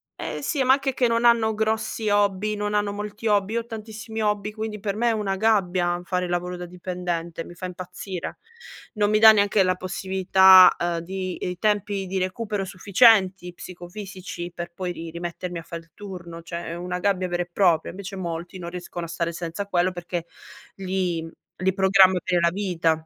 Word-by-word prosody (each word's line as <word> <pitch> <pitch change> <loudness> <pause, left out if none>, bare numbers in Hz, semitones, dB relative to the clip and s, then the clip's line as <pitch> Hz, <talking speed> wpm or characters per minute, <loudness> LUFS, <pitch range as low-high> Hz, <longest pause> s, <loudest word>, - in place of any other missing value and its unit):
eh - - -5
sì 285 -4 0
ma 260 +1 +6
anche 270 -1 0
che 250 -1 +2
non 230 +1 +1
hanno 230 -2 +4
grossi 220 0 -1
hobby, 205 0 +1
non 210 0 -2
hanno 205 -1 0
molti 210 +2 -7
hobby, 205 -1 +2
io 235 - +1
ho - - -14
tantissimi 220 0 -7
hobby 210 0 0
quindi 215 0 -5
per 200 0 -3
me 240 +2 +1
è - - +3
una 205 -3 -1
gabbia 180 -5 +1
fare 180 0 -1
il - - -6
lavoro 180 +1 -2
da 180 0 -7
dipendente, 175 -2 -4
mi 175 - -12
fa 185 - -7
impazzire. 180 0 -6 0.6
Non 210 -2 +1
mi 215 - +3
dà 220 0 +10
neanche 205 -1 +3
la 185 0 +2
possibilità, 190 0 +6
ehm, 170 -1 -1
di 185 +1 -5
i 180 - -5
tempi 205 -1 0
di 190 0 -2
recupero 205 +2 -2
sufficienti 190 -2 +3
psicofisici 180 0 -8
per 170 0 -6
poi 180 0 -4
ri 165 -1 -7
rimettermi 175 +1 -5
a 165 - -7
fare 170 0 -7
il 165 -1 -25
turno, 175 -4 -9
cioè 170 +1 -6
è 165 - -4
una 180 +1 -4
gabbia 185 -1 +1
vera 175 0 -1
e 175 - -17
propria. 175 -3 +2
Invece 195 +1 -7
molti 175 0 -5
non 170 -1 -6
riescono 175 -1 -6
a 165 - -10
stare 170 0 -2
senza 170 +3 -4
quello, 185 -1 +1
perché 175 -1 -5 0.5
li 185 -4 -2 0.3
li 185 +1 +1
programma 190 -1 +5
per 180 -1 +1
la 170 - +4
vita. 180 -4 0
185 Hz, 195 wpm, -24 LUFS, 175-210 Hz, 0.6 s, dà